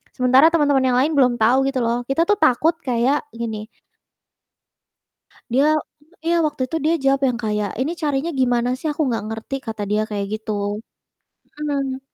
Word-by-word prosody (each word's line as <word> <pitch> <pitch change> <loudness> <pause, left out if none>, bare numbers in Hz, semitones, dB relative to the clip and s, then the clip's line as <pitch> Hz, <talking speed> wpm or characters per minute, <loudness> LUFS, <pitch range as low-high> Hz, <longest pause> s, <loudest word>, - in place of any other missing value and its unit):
sementara 255 +4 +5
teman-teman 285 -4 +3
yang 250 -1 +2
lain 285 +5 +2
belum 250 -3 +4
tahu 255 +5 +3
gitu 270 -1 -1
loh, 235 +1 0
kita 275 +5 +2
tuh 415 - +4
takut 315 +5 +3
kayak 255 +3 +1
gini 220 -2 -5 1.8
Dia 285 +6 +3 0.5
iya, 340 +1 +2
waktu 295 -3 -3
itu 325 - -1
dia 320 +2 +3
jawab 270 0 +3
yang 245 -2 -2
kayak, 210 -2 -1
"Ini 285 +6 0
carinya 290 +2 0
gimana 245 -4 +1
sih, 315 - -6
aku 300 - -2
nggak 225 -4 -2
ngerti." 225 +4 -6
Kata 220 -2 -4
dia 210 +1 +2
kayak 200 -1 -2
gitu. 205 -1 -3 0.8
Mmm. 275 -3 -2
255 Hz, 165 wpm, -21 LUFS, 230-285 Hz, 1.8 s, sementara